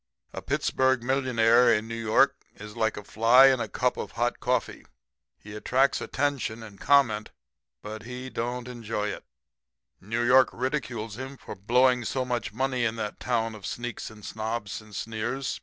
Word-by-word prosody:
"'A - - -5
Pittsburg 130 -2 +1
millionaire 125 -2 +4
in 110 0 +1
New 115 - -6
York 115 +5 +3 0.2
is 105 0 -10
like 110 -1 0
a 105 - -6
fly 120 +6 +6
in 130 -2 +2
a 115 - -2
cup 125 +4 0
of - - -6
hot 120 +1 -1
coffee 125 -2 -1 0.5
he 105 - -12
attracts 130 +6 +1
attention 135 -6 -2
and 105 -3 -12
comment, 120 -7 +3 0.5
but 110 +1 -7
he 125 +3 -7
don't 125 0 -4
enjoy 115 -4 -3
it. - - -6 0.8
New 115 +5 -2
York 125 +1 +6
ridicules 120 -4 -3
him 135 +1 -7
for - - -9
"blowing" 125 +5 +3
so 130 +2 -2
much 120 -3 -2
money 130 +2 -1
in 115 -1 0
that 105 -2 -5
town 115 -2 -1
of 105 -2 -11
sneaks 120 +1 -5
and 105 -2 -13
snobs, 110 -2 -4
and 105 -1 -14
sneers. 115 +5 -3
120 Hz, 170 wpm, -27 LUFS, 110-130 Hz, 0.8 s, fly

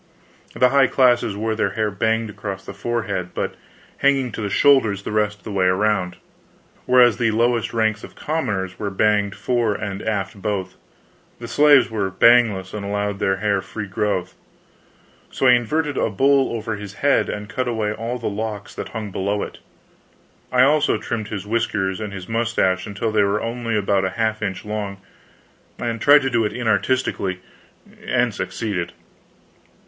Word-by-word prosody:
The 125 +1 +4
high 135 0 +4
classes 120 -6 +3
wore 110 +2 -1
their 110 - -1
hair 110 -1 -1
banged 110 +2 0
across 95 -2 -6
the - - -7
forehead 105 -3 -3
but - - -2 0.4
hanging 135 -3 +2
to 110 - -6
the 100 - -2
shoulders 110 -5 +3
the - - -5
rest 105 -1 0
of 90 - -29
the 105 - -7
way 95 -2 +2
around, 95 -2 +1 0.7
whereas 125 -2 +5
the 115 -2 +2
lowest 115 +1 +1
ranks 110 -2 0
of - - -11
commoners 100 - -3
were 105 - -2
banged 105 0 +1
fore 115 0 0
and 100 -1 -4
aft 100 -1 -3
both; 100 -3 -2 0.6
the 120 - -8
slaves 145 0 +5
were 100 -3 -1
bangless, 100 -2 +4
and 105 -1 -5
allowed 100 0 -2
their 95 - +1
hair 100 0 0
free 105 +1 -6
growth. 95 -1 -2 1.0
So - - -2
I 125 - +8
inverted 145 +5 +1
a - - +1
bowl 135 +6 +3
over 115 -1 -3
his 100 -1 -9
head 140 - +3
and 105 0 -5
cut 125 +4 -3
away 110 -3 -1
all 115 +3 -4
the 115 - -9
locks 105 0 -4
that - - -6
hung 110 -3 -6
below 100 +2 -1
it. - - -8 0.9
I 125 0 +5
also 145 -3 +3
trimmed 110 0 -4
his 100 -2 -5
whiskers 100 -4 -1
and 100 -3 -6
mustache 115 -5 0
until 105 +2 -2
they 110 - +3
were 100 +1 +1
only 115 -1 -2
about 100 -1 +1
a 95 - 0
half 110 -1 0
inch 95 -2 -4
long; 105 -2 -4 0.8
and 115 -2 -3
tried 145 0 +6
to 135 - -1
do 115 -2 +2
it 105 - -2
inartistically, 110 -4 0 0.7
and - - +1
succeeded. 90 -6 -3
110 Hz, 170 wpm, -21 LUFS, 100-120 Hz, 1.0 s, I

